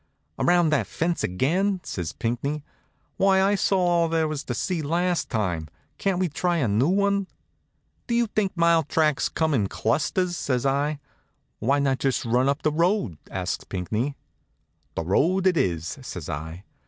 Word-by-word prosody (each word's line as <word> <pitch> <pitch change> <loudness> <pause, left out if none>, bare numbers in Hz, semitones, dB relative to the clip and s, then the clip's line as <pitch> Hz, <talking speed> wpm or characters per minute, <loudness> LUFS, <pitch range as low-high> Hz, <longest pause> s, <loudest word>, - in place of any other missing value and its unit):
Around 175 -2 +3
that 155 - +1
fence 170 +1 -1
again?" 180 - +1
says 85 -5 -4
Pinckney. 130 - -2 0.5
"Why, 195 0 +4
I 195 +2 +3
saw 195 -1 +2
all 175 -2 +2
there 160 -1 +1
was 155 -2 -4
to 120 - -3
see 175 - -1
last 175 +4 0
time. 90 -9 -1 0.3
Can't 195 -2 +1
we 185 0 +1
try 175 +3 0
a 140 -7 +1
new 110 +7 +2
one?" 200 0 +2 0.8
"Do 235 - 0
you 235 0 +3
think 210 -4 -1
mile 170 -1 +4
tracks 155 -1 +1
come 160 -1 0
in 105 -7 +2
clusters?" 160 - 0
says 130 -5 -1
I. 140 +2 +1 0.6
"Why 135 +5 +2
not 135 -2 +1
just 135 -3 0
run 125 +3 +2
up 140 +1 -1
the 155 - +2
road?" 165 - +1
asks 95 0 -3
Pinckney. 110 +9 -2 0.8
"The - - -1
road 170 - +2
it 185 -2 +4
is," 85 - -1
says 90 - -7
I. 80 +4 -6
150 Hz, 165 wpm, -25 LUFS, 115-180 Hz, 0.8 s, Why